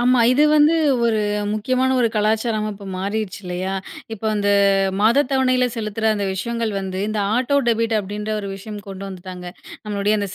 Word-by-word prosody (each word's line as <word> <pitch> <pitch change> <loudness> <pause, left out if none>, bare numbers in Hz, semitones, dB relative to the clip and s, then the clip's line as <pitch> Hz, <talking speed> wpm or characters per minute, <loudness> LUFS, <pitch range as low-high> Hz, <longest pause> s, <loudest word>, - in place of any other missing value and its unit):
ஆமா. 250 +1 +4
இது 285 +4 +3
வந்து 305 +2 +5 0.3
ஒரு 225 -2 +2 0.3
முக்கியமான 255 +5 +1
ஒரு 235 - +3
கலாச்சாரமா 215 0 +1
இப்ப 200 0 -11
மாறிச்சு 200 +1 -3
இல்லையா? 180 +1 -3 0.4
இப்ப 220 0 -7
அந்த 205 -1 0 0.5
மாதத் 235 +6 +4
தவணையில 255 -1 +2
செலுத்துற 220 0 -4
அந்த 205 -1 -2
விஷயங்கள் 230 +3 -2
வந்து 190 -1 -4
இந்த 215 0 -2 0.2
ஆட்டோ 260 +3 +1
டெபிட் 230 0 +1
அப்படின்ற 210 +2 -4
ஒரு 200 - -6
விஷயம் 210 +1 -8
கொண்டு 195 0 -7
வந்துட்டாங்க, 185 -1 -8 0.4
நம்மளுடைய 210 0 0
அந்தச் 200 -2 -4
215 Hz, 160 wpm, -21 LUFS, 200-235 Hz, 0.5 s, வந்து